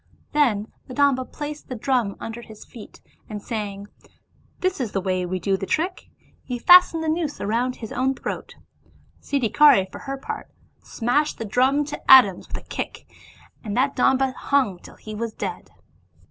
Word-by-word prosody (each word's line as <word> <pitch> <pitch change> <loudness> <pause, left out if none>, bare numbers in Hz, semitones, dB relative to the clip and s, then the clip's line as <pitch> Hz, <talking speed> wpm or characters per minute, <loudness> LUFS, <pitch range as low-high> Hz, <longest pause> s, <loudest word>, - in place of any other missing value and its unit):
Then 230 -8 +1 0.2
the 255 - -8
Domba 275 -3 +2
placed 295 0 -7
the 255 - -4
drum 235 -4 0
under 225 +1 -6
his 220 -2 -13
feet, 225 -4 -13 0.3
and 210 -1 -5
saying, 205 -2 -5 0.4
" - - -37
This 370 -5 0
is 230 -5 -3
the 195 - +1
way 185 -1 -1
we 185 +1 -2
do 195 +2 0
the 195 - -5
trick,*' 360 +4 -2 0.3
he 250 - -4
fastened 345 +4 +6
the - - -3
noose 315 -2 -1
round 240 +5 -1
his 220 - -9
own 265 +1 0
throat; - - -6 0.7
Siddhikari 275 -4 +4
for - - -9
her 275 0 -5
part 270 - -7 0.3
smashed 285 +6 0
the 225 - -5
drum 260 +7 +2
to 295 - -7
atoms 225 -9 +7
with - - -5
a - - -9
kick, - - -6 0.6
and 210 -2 -4
that 275 +2 +1
Domba 265 0 +2
hung 260 -11 0
till - - -14
he 215 - -10
was 225 +1 -4
dead. - - -5
250 Hz, 175 wpm, -23 LUFS, 210-280 Hz, 0.7 s, atoms